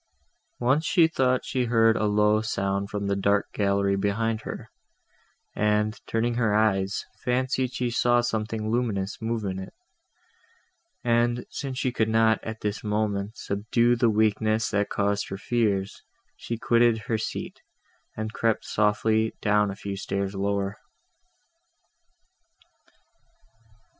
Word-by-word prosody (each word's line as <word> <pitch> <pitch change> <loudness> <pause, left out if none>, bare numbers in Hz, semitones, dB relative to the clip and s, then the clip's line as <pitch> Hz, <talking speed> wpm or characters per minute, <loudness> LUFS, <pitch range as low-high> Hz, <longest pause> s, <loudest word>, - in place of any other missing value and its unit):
Once 130 +6 +2
she 170 -1 +4
thought 130 -5 +1
she 130 -2 -1
heard 115 -1 +4
a 110 - 0
low 105 +1 +3
sound 100 -2 -2
from 105 -1 -3
the 100 0 0
dark 100 +1 +1
gallery 100 -1 +1
behind 110 +3 0
her; - - -8 0.8
and, 105 +1 +1
turning 115 +1 0
her 115 -3 +1
eyes, 100 -3 +1 0.2
fancied 130 0 0
she 125 -2 -2
saw 120 +1 +3
something 110 -2 -2
luminous 110 -5 -1
move 110 -1 -2
in 95 -1 -3
it; 95 - -9 1.3
and, 120 0 +1
since 135 -3 -5
she 130 - 0
could 110 -3 0
not, 110 0 +3
at 110 0 -6
this 105 0 -3
moment, 105 -1 -1
subdue 115 +4 +1
the 120 -1 +3
weakness 110 0 +1
that 105 -1 0
caused 100 0 -1
her 95 - -4
fears, 105 -3 -1 0.3
she 115 - -5
quitted 115 -1 +3
her 110 -2 -1
seat, - - -5 0.6
and 110 0 -4
crept 115 -1 0
softly 110 +1 +1
down 105 -1 +2
a 100 - -5
few 100 -1 -5
stairs 100 0 -3
lower. 100 +1 -1
110 Hz, 135 wpm, -26 LUFS, 100-115 Hz, 1.3 s, she